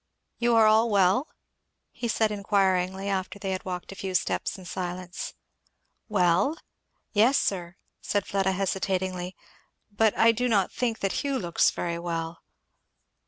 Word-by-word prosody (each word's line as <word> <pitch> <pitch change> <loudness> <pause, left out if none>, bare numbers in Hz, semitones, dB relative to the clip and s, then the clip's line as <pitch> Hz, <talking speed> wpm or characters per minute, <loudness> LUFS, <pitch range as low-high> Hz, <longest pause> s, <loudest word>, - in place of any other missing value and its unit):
"You 240 -1 +3
are 225 -1 +6
all 220 +2 +5
well?" 200 - +3 0.6
he 240 - -4
said 220 -1 +1
inquiringly, 195 -2 +1
after 190 0 -2
they 195 -1 -4
had 185 - -3
walked 180 0 -5
a - - -8
few 190 -1 -4
steps - - 0
in 185 - -12
silence. 180 0 -5 0.7
"Well? 195 - +2 0.6
yes, 230 +6 +5
sir, 180 -2 -1
" - - -53
said 205 -2 -1
Fleda 195 -2 0
hesitatingly, 185 -1 -2 0.6
"but 215 +1 +2
I 230 +1 +6
do 245 +2 -1
not 200 -5 +2
think 235 -3 -2
that 195 - 0
Hugh 280 -1 0
looks 175 -8 +2
very 170 -1 -3
well." 165 -1 -4
195 Hz, 150 wpm, -27 LUFS, 180-215 Hz, 0.7 s, are